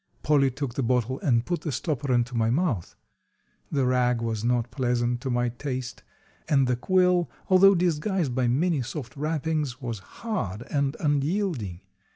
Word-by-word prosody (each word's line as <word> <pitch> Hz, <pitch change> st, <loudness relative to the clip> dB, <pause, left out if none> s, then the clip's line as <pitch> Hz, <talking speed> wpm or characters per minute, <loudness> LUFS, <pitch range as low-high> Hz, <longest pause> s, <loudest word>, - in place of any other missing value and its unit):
Polly 140 Hz, -2 st, +4 dB
took 135 Hz, -1 st, -4 dB
the 135 Hz, -, -2 dB
bottle 125 Hz, +1 st, 0 dB
and 120 Hz, -4 st, +2 dB
put 175 Hz, -1 st, -2 dB
the 155 Hz, -, -3 dB
stopper 140 Hz, 0 st, -2 dB
into 120 Hz, 0 st, +1 dB
my 115 Hz, -1 st, +2 dB
mouth. 130 Hz, -, 0 dB, 0.8 s
The 140 Hz, -3 st, +1 dB
rag 125 Hz, -1 st, +2 dB
was 115 Hz, -2 st, -2 dB
not 120 Hz, 0 st, 0 dB
pleasant 120 Hz, -2 st, 0 dB
to 135 Hz, -, -3 dB
my 120 Hz, 0 st, +1 dB
taste, 125 Hz, 0 st, -5 dB, 0.5 s
and 135 Hz, -3 st, +4 dB
the 125 Hz, 0 st, +1 dB
quill, 180 Hz, +5 st, +2 dB, 0.2 s
although 195 Hz, +1 st, +7 dB
disguised 175 Hz, -, 0 dB
by 125 Hz, -1 st, +1 dB
many 150 Hz, +4 st, +1 dB
soft 125 Hz, 0 st, -6 dB
wrappings, 150 Hz, -3 st, -2 dB
was 115 Hz, -5 st, -4 dB
hard 105 Hz, -, -4 dB
and 140 Hz, -1 st, 0 dB
unyielding. 145 Hz, -, -1 dB
130 Hz, 160 wpm, -26 LUFS, 120-155 Hz, 0.8 s, although